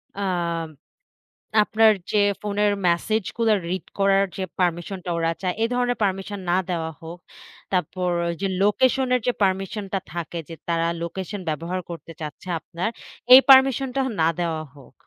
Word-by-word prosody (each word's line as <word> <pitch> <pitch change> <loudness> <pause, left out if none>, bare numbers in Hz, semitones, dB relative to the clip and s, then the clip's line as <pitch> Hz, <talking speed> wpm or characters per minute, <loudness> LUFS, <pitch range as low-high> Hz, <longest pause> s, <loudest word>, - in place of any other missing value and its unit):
আ - - -7 1.4
আপনার 220 +1 +4 0.2
যে - - +2 0.2
ফোনের 205 0 +1 0.2
মেসেজ 200 +5 +1
গুলো 225 -2 +3 0.2
রিড 185 +1 -3
করার 195 0 +4
যে 190 - -2 0.2
পারমিশন 175 +2 0
টা - - -4
ওরা 165 0 +1
চায় 185 -2 -1
এ - - +4
ধরনের 245 0 0
পারমিশন 195 +1 -2
না 180 - +3
দেওয়া 165 -2 -2
হোক। 165 +2 -9 0.5
তারপর 180 0 -1 0.3
যে 195 - +1
লোকেশন 260 +6 +3
এর - - +2
যে - - +4
পারমিশন 195 +2 -1
টা 195 - +1
থাকে 170 0 -4
যে 165 - -7
তারা 165 -1 +1 0.2
লোকেশন 190 +4 -5
ব্যবহার 165 +4 -3
করতে 170 -1 -8
চাচ্ছে 155 +4 -7
আপনার 175 +7 -4 0.4
এই 260 - +12
পারমিশন 270 0 +7
টা 270 - +2 0.2
না 160 - +4
দেওয়া 165 -2 -1
হোক। 135 -3 -16
190 Hz, 160 wpm, -23 LUFS, 170-210 Hz, 1.4 s, এই